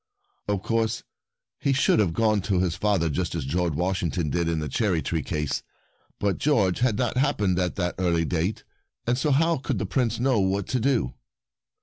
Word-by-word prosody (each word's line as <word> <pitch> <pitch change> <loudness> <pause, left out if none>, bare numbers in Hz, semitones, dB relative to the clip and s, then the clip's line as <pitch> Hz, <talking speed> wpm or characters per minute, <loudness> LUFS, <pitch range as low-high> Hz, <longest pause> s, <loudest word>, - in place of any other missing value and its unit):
Of 100 -2 -1
course 115 -1 0 0.6
he 140 - +1
should 135 -4 +3
have 100 -6 +3
gone 110 +1 +2
to 95 - +3
his 90 -2 +1
father 95 -2 +1
just 85 +3 -2
as 80 -5 -3
George 85 +2 0
Washington 85 -3 -1
did 85 -1 0
in 85 - 0
the 75 -1 -2
cherry 90 - 0
tree 80 -2 -1
case, 75 0 -2 0.6
but 100 -2 0
George 105 -11 +2
had 120 -4 +2
not 125 +1 0
happened 105 -10 +1
at 90 -1 -1
that 90 -3 -1
early 85 -3 +2
date, 85 +6 -1 0.4
and 120 - +2
so 135 +4 0
how 165 +4 +3
could 135 -2 -2
the 100 - -2
Prince 115 +5 0
know 125 -2 +2
what 95 0 +1
to 130 - +1
do 120 - +1
95 Hz, 195 wpm, -25 LUFS, 85-115 Hz, 0.6 s, should